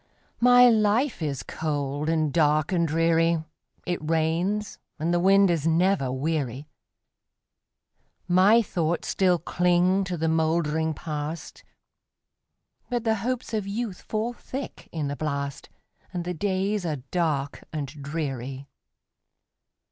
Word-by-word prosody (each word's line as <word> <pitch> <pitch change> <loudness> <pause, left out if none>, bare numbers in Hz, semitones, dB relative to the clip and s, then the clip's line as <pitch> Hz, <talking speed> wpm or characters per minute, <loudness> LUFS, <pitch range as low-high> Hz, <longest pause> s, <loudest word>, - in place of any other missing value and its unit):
My 245 +1 +7
life 225 +2 +2
is 145 -4 -2
cold, 145 -1 -2
and 155 -3 +1
dark, 155 0 +2
and 170 -2 +2
dreary; 165 +1 +2 0.4
It 175 -1 -1
rains, 165 +6 -1 0.2
and 165 +2 -1
the 175 - +3
wind 195 +1 +5
is 165 -2 0
never 165 -4 +2
weary; 140 -1 -2 1.6
My 195 +6 +5
thoughts 170 -4 -2
still 185 -2 +3
cling 180 +3 +2
to 180 -1 -3
the 160 +1 0
moldering 160 -1 +1
Past, 155 +1 -6 1.3
But 240 -2 -1
the 220 -1 +1
hopes 250 +1 -3
of 210 -3 -1
youth 205 -2 -4
fall 225 +2 -2
thick 265 +3 -7
in 155 -3 -2
the 140 - -3
blast, 140 -2 -4 0.4
And 175 -2 -4
the 180 - -2
days 195 +3 -1
are 150 -7 -3
dark 150 -6 -1
and 150 -3 -3
dreary. 140 -2 -5
165 Hz, 125 wpm, -26 LUFS, 150-195 Hz, 1.6 s, My